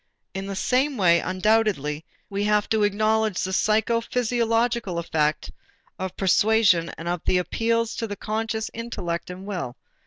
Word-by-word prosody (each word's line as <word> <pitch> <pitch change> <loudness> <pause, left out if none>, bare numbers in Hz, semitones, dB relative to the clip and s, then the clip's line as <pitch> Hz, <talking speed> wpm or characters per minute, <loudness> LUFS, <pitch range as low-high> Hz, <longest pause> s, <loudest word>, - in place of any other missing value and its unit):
And 195 0 -4
in - - -7
the 195 - -4
same 260 +7 +1
way 170 -4 +5
undoubtedly 185 -6 +1 0.2
we 200 0 -2
have 210 0 +2
to 220 -1 +2
acknowledge 215 0 +1
the 190 - -2
psychophysiological 230 0 +1
effect 155 -2 -1 0.5
of 190 -1 -5
persuasion 195 -3 +3
and 165 - -7
of 175 -1 -1
the 185 - +3
appeals 230 +6 0
to 225 - -2
the 205 - -5
conscious 220 +2 -3
intellect 180 -8 -4
and 185 +1 -8
will. 180 -12 -5
210 Hz, 150 wpm, -24 LUFS, 180-225 Hz, 0.5 s, way